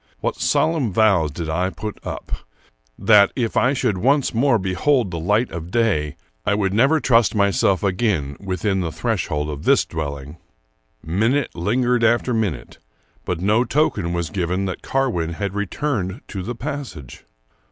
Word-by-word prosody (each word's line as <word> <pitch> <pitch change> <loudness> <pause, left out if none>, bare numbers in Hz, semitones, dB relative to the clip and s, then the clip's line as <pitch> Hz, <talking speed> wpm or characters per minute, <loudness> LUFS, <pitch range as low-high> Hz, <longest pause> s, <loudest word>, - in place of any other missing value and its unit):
What - - -2
solemn 155 -9 +1
vows 95 -6 +3
did 80 +3 -5
I 90 +4 0
put 105 +2 -7
up, - - -7 0.7
that, 105 -3 +5
if 120 -4 -1
I 125 +2 +3
should 120 -8 0
once 135 +6 +2
more 120 +1 +3
behold 95 +4 +1
the 85 - -4
light 105 +8 +1
of 85 0 -6
day, 95 -10 0 0.3
I 100 - +1
would 95 -2 0
never 135 +9 +4
trust 115 -4 +3
myself 100 -2 +2
again 90 -8 0
within 95 +1 -1
the 85 -3 -2
threshold 75 -1 -2
of 75 0 -7
this - - +4
dwelling! 70 -1 -6 0.7
Minute 110 - 0
lingered 120 +7 +1
after 120 +2 +2
minute, 90 - -3 0.5
but 90 -2 -2
no 105 +5 +3
token 125 - 0
was 85 -3 -2
given 90 +1 -1
that 95 - -4
Carwin 110 -12 -1
had 100 +2 -3
returned 105 - -2
to 95 - -5
the 120 +6 -5
passage. 125 - -7
100 Hz, 155 wpm, -21 LUFS, 85-120 Hz, 0.7 s, that